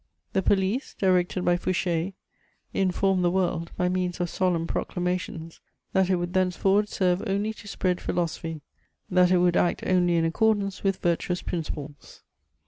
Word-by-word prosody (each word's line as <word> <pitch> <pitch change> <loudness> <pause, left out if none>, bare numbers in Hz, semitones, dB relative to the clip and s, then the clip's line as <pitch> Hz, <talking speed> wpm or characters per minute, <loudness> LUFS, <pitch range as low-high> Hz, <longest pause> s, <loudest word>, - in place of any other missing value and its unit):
] - - -46
The 190 - +2
police, 200 +7 0
directed 185 -1 +1
by 175 0 +3
Fouché, 175 0 -1 0.6
informed 190 0 +1
the 175 - +4
world, 175 -2 -1
by 180 - +1
means 180 -1 -1
of 175 -1 -1
solemn 180 -3 +1
proclamations, 175 -2 -3 0.3
that 190 -1 +3
it 185 - +4
would 175 0 -3
thenceforward 190 +2 +2
serve 180 -1 +1
only 200 +3 0
to 210 - -13
spread 185 -2 -1
philosophy, 165 -2 -3 0.5
that 180 0 +5
it 185 - +4
would 175 0 +3
act 175 - +1
only 175 -2 +3
in 165 -1 +2
accordance 200 +2 +1
with 195 -1 +1
virtuous 175 +1 0
principles. 150 -3 -6
180 Hz, 155 wpm, -26 LUFS, 175-190 Hz, 0.6 s, that